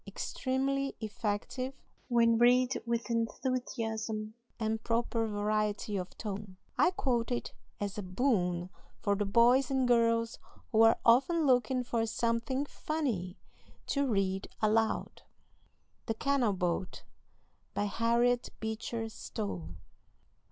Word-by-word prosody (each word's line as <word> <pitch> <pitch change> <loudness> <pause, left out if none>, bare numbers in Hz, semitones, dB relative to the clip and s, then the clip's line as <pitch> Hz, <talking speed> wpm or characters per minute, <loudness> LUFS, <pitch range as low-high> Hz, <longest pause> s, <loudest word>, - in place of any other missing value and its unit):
Extremely 275 +1 -1
effective 230 +4 -3 0.3
when 230 -2 +4
read 250 +2 +4
with 235 0 -1
enthusiasm 225 -2 -2 0.3
and 220 0 -1
proper 230 -1 0
variety 210 0 -1
of 180 -2 -4
tone. 205 -3 -6 0.2
I - - +5
quote 260 - 0
it 240 - -2 0.3
as 205 0 -3
a - - -2
boon 185 -4 0 0.3
for 200 - +1
the 205 0 -1
boys 245 +5 +5
and 265 -2 +2
girls 230 -1 +2 0.3
who 220 - +4
are 225 0 +6
often 275 +8 +4
looking 255 -1 +3
for 230 -2 -1
something 230 +4 0
"funny" 245 - -3 0.5
to 280 -1 0
read 195 -4 0
aloud. 220 +1 +1 0.9
THE 225 - 0
CANAL 255 -3 +1
BOAT. 180 0 -2 0.7
BY 205 - +1
HARRIET 235 +4 +2
BEECHER 220 +1 -3
STOWE. 90 - -5
230 Hz, 115 wpm, -31 LUFS, 210-250 Hz, 0.9 s, are